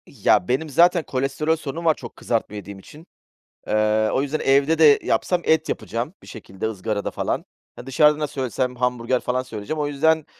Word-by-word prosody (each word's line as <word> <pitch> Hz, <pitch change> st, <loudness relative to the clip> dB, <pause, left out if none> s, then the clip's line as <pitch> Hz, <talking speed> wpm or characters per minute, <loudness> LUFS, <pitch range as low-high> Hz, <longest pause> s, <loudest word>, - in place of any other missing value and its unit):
Ya, 90 Hz, -, +2 dB
benim 135 Hz, +5 st, -1 dB
zaten 170 Hz, +4 st, +4 dB
kolesterol 135 Hz, +4 st, -1 dB
sorunum 160 Hz, +2 st, -6 dB
var 160 Hz, -, +5 dB
çok 120 Hz, -5 st, -11 dB
kızartma 115 Hz, -3 st, -2 dB
yediğim 100 Hz, -1 st, -8 dB
için. 155 Hz, -, -15 dB, 0.6 s
Eee, 110 Hz, 0 st, +2 dB
o 130 Hz, -, +2 dB
yüzden 145 Hz, +2 st, -2 dB
evde 140 Hz, +4 st, +3 dB
de 150 Hz, -3 st, +7 dB
yapsam 180 Hz, -1 st, +1 dB
et 160 Hz, 0 st, +2 dB
yapacağım 120 Hz, +8 st, -3 dB
bir -, -, -16 dB
şekilde 100 Hz, -2 st, -8 dB
ızgarada 105 Hz, 0 st, -3 dB
falan. -, -, -2 dB, 0.3 s
Ha, 120 Hz, -, -10 dB
dışarıdan 150 Hz, +3 st, +3 dB
da 150 Hz, -, -1 dB
söylesem 130 Hz, -2 st, -3 dB
hamburger 125 Hz, 0 st, 0 dB
falan 125 Hz, +1 st, -2 dB
söyleyeceğim. 125 Hz, +5 st, -6 dB
O 145 Hz, -, 0 dB
yüzden, 155 Hz, +2 st, +1 dB
135 Hz, 180 wpm, -22 LUFS, 115-155 Hz, 0.6 s, de